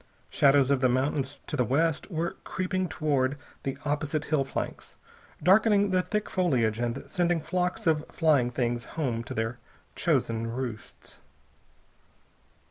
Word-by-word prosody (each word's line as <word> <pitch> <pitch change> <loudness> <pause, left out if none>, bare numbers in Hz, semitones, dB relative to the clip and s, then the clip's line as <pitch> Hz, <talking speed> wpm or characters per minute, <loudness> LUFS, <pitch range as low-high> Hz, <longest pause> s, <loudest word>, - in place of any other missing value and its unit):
Shadows 140 -1 +4
of 135 -2 +2
the 130 - +4
mountains 135 +2 -1
to - - -4
the 125 - +2
west 155 - 0
were 170 -1 -1
creeping 185 -1 -2
toward 140 -3 0 0.2
the 135 - -3
opposite 150 +1 -1
hill 150 -3 +1
flanks, 135 - -5 0.5
darkening 205 +2 +5
the 185 -1 +3
thick 210 +3 -2
foliage 120 -12 +1
and 120 +2 -2
sending 175 +3 +1
flocks 180 +6 -2
of 160 -2 +2
flying 150 -7 +2
things 120 -1 -1
home 120 -7 -1
to - - -6
their 115 +2 -2 0.4
chosen 115 0 0
roosts. 115 -2 -6
145 Hz, 135 wpm, -28 LUFS, 125-170 Hz, 0.5 s, darkening